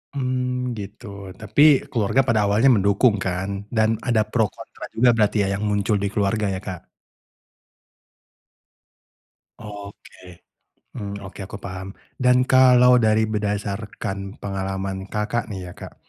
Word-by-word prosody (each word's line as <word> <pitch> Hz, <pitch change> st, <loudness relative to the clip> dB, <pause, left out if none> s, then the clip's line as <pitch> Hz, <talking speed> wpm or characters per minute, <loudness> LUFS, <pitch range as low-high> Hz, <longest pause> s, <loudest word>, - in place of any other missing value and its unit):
Mmm, 125 Hz, -1 st, -2 dB
gitu 105 Hz, +4 st, -9 dB, 0.4 s
tapi 110 Hz, +6 st, 0 dB, 0.3 s
keluarga 115 Hz, +3 st, +2 dB
pada 115 Hz, -3 st, +3 dB
awalnya 110 Hz, +7 st, +4 dB
mendukung 100 Hz, +3 st, +3 dB
kan 95 Hz, +1 st, -2 dB, 0.3 s
dan 110 Hz, 0 st, +3 dB, 0.2 s
ada 115 Hz, -3 st, +3 dB
pro 115 Hz, -3 st, +2 dB
kontra -, -, -12 dB
juga 120 Hz, +2 st, +4 dB
berarti 105 Hz, -1 st, +2 dB
ya -, -, -1 dB
yang -, -, -4 dB
muncul 105 Hz, +1 st, +1 dB
di -, -, +1 dB
keluarga 105 Hz, +1 st, 0 dB
ya -, -, -4 dB
Kak? 90 Hz, -3 st, -7 dB, 2.7 s
Oke, 100 Hz, -3 st, -12 dB, 0.5 s
mmm, 100 Hz, -1 st, -6 dB
oke 95 Hz, 0 st, -11 dB
aku 100 Hz, -, -8 dB
paham 95 Hz, +1 st, -7 dB, 0.2 s
dan 125 Hz, 0 st, +4 dB
kalau 125 Hz, -1 st, +6 dB
dari 110 Hz, -1 st, +3 dB
berdasarkan 105 Hz, -2 st, -3 dB
pengalaman 95 Hz, -1 st, -4 dB
Kakak 105 Hz, +4 st, -2 dB
nih 95 Hz, -4 st, -7 dB
ya -, -, -10 dB
Kak, -, -, -10 dB
105 Hz, 130 wpm, -22 LUFS, 100-120 Hz, 2.7 s, kalau